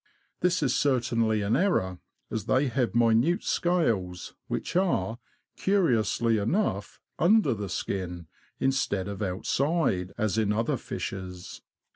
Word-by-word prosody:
This 180 -2 +1
is 130 -2 +1
certainly 115 -6 +1
an 100 +2 +1
error, 95 - +1 0.3
as 110 -3 -3
they 130 +3 +2
have 120 -1 -1
minute 120 +8 +3
scales, 110 - 0
which - - -4
are, 120 - +1 0.4
curiously 115 - +2
enough, 105 - -1 0.2
under 180 - +4
the 105 -2 -4
skin^ 90 -2 -4 0.3
instead 130 -8 0
of 100 0 -6
outside, 100 - 0
as 110 -1 0
in 105 -2 +1
other 115 +2 0
fishes. 90 -1 -6
115 Hz, 120 wpm, -27 LUFS, 100-140 Hz, 0.4 s, under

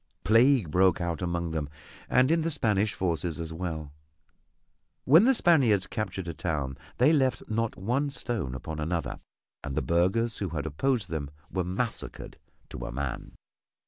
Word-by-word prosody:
Plague 115 - +4
broke 90 +1 +4
out 85 -1 -2
among 85 -2 -2
them 75 -3 -3 0.4
and 130 +3 +4
in 165 0 +3
the 165 - 0
Spanish 110 -9 +1
forces 85 -2 -1
as 80 -1 -4
well. 80 -4 -5 1.1
When 160 - +7
the 265 +1 +5
Spaniards 130 - +4
captured 95 -4 -4
a 85 - -3
town 75 -5 -2 0.2
they 140 +6 +5
left 135 -4 +2
not 115 +1 -1
one 125 +11 -1
stone 110 - -3
upon 75 +5 -6
another, 80 +2 -2 0.4
and 70 -2 -4
the - - +1
burghers 95 +7 +1
who 95 - -3
had 75 -2 -4
opposed 100 - -1
them 75 -3 -3 0.2
were 95 -1 -1
massacred 100 +6 -4 0.3
to - - -6
a - - -6
man. 70 +1 -4
90 Hz, 160 wpm, -28 LUFS, 80-120 Hz, 1.1 s, When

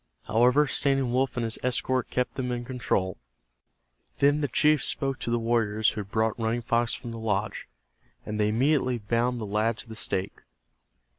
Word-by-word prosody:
However, 125 +7 +4
Standing 135 -3 +1
Wolf 130 +1 0
and 120 - 0
his 115 -1 -4
escort 125 0 0
kept 125 -2 -1
them 125 -2 -3
in 120 0 -3
control. 120 -7 -1 1.0
Then 145 +1 +4
the 145 - +1
chief 150 +2 +3
spoke 135 -1 -1
to - - -4
the 120 - +2
warriors 110 -2 +2
who 105 - -4
had 100 - -10
brought 110 +1 0
Running 115 +1 -1
Fox 115 0 +1
from 120 - -7
the 115 - -6
lodge, 105 -2 -2 0.6
and 105 0 -4
they 105 - +3
immediately 130 +2 +2
bound 120 +3 0
the 110 - -4
lad 110 +2 0
to - - -10
the 110 - -9
stake. 95 -2 -3
120 Hz, 180 wpm, -27 LUFS, 110-125 Hz, 1.0 s, However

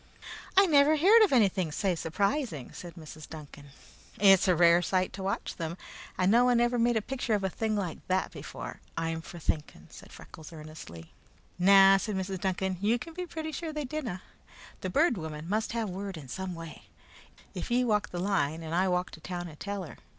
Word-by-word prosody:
"I 390 - +8
never 300 -2 +5
heard 420 +9 +7
of 420 - +3
anything 195 - +2
sae 190 +4 0
surprising," 180 - -2
said 175 -1 -9
Mrs. 155 -2 -11
Duncan. 145 -2 -11 0.5
"It's 195 -1 +6
a 180 - +4
rare 170 0 +5
sight 185 0 0
to 195 - -7
watch 195 +1 -3
them, 165 +1 -4 0.4
and 185 +1 +3
no 235 +2 +6
one 245 -1 +4
ever 240 0 +2
made 235 0 +3
a 215 - -1
picture 245 -4 -1
of 200 - -2
a 190 - -1
thing 220 +2 -1
like 185 -6 -3
that 185 0 0
before, - - -8 0.2
I'm 165 0 -2
for 175 - -10
thinking," 150 - -3
said - - -13
Freckles 160 0 -12
earnestly. 150 - -10 0.5
"Na," 195 +1 +7
said 210 +1 -3
Mrs. 190 0 -3
Duncan. 190 -1 -1
"Ye 220 +4 +2
can 285 +7 -9
be 360 +1 -5
pretty 315 -1 -5
sure 320 +2 -4
there 300 -1 -4
didna. 250 -10 -5 0.6
The 185 - -4
Bird 290 - +2
Woman 155 0 -6
must 215 +4 -1
have 230 -2 -1
word 195 0 -5
in 145 -4 -10
some 190 +4 -5
way, 165 -1 -10 0.7
if - - -5
ye 245 +1 +2
walk 210 -4 +1
the 175 - -6
line 165 -4 0
and 160 0 -5
I 185 +2 +2
walk 180 0 0
to - - -11
town 175 0 -5
and 150 - -14
tell 200 -1 -4
her. 160 - -10
190 Hz, 205 wpm, -29 LUFS, 170-235 Hz, 0.7 s, I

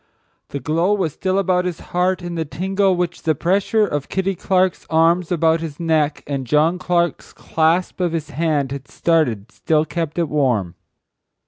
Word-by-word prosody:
The 140 - -4
glow 165 +9 +1
was 175 -8 -1
still 190 0 -1
about 185 -2 +1
his 180 -2 -3
heart 180 +1 +1
and 175 -1 -5
the 165 - -1
tingle 190 +6 0
which 175 -1 -2
the 155 -2 +1
pressure 200 +7 +2
of 145 -7 -3
Kitty 190 0 0
Clark's 185 0 0
arms 165 +2 +2
about 165 -1 +2
his 155 -3 -6
neck, 155 -3 0
and 135 -3 -4
John 155 +6 +2
Clark's 175 -1 -1
clasp 165 +4 0
of 175 -2 +1
his 160 -3 -4
hand 150 -3 0
had 140 -1 -6
started 125 -11 0
still 155 -1 +1
kept 165 -1 -4
it 170 -2 +1
warm. 125 - 0
165 Hz, 175 wpm, -20 LUFS, 150-180 Hz, -, pressure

